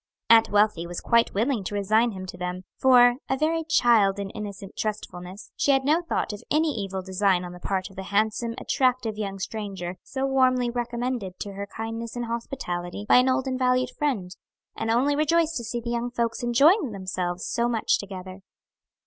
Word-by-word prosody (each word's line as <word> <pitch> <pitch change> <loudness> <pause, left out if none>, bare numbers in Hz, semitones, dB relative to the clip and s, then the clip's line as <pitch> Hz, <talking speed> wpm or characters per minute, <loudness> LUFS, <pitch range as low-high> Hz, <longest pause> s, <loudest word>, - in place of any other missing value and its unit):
Aunt 225 -1 +7
Wealthy 205 -5 +2
was 175 0 -5
quite 235 -3 +2
willing 230 +1 +1
to 205 - -4
resign 215 +4 +2
him 185 -1 -7
to 180 - -8
them; 180 0 -4
for 245 -2 +6
a 265 - +1
very 325 +3 +1
child 225 -9 +4
in 200 -1 -4
innocent 200 -2 -8
trustfulness 195 -3 -5
she - - 0
had 270 -1 +3
no 310 +4 +3
thought 335 -9 -2
of 205 - -8
any 315 +2 +2
evil 195 -3 -4
design 190 -1 +1
on 175 - -7
the 180 - -10
part 190 +1 -2
of - - -17
the 195 - -5
handsome, 220 +3 0
attractive 255 -4 0
young 200 -2 -4
stranger 190 -3 -5
so 265 -1 -3
warmly 255 -2 +2
recommended 240 -5 -3
to 200 - -5
her 200 +1 -6
kindness 225 +2 -6
and 240 0 -3
hospitality 205 -6 -4
by - - +6
an 250 +1 +4
old 260 +1 +1
and 260 -1 -2
valued 255 0 +2
friend, 245 -13 -2 0.4
and 225 - -3
only 260 +6 +2
rejoiced 320 +2 +2
to 240 - -4
see 235 +1 -3
the 235 0 -5
young 240 0 -1
folks 235 0 -2
enjoying 275 - +4
themselves 185 -2 -3
so 235 0 0
much 230 -2 +1
together. 185 -1 -8
225 Hz, 190 wpm, -25 LUFS, 195-255 Hz, 0.4 s, Aunt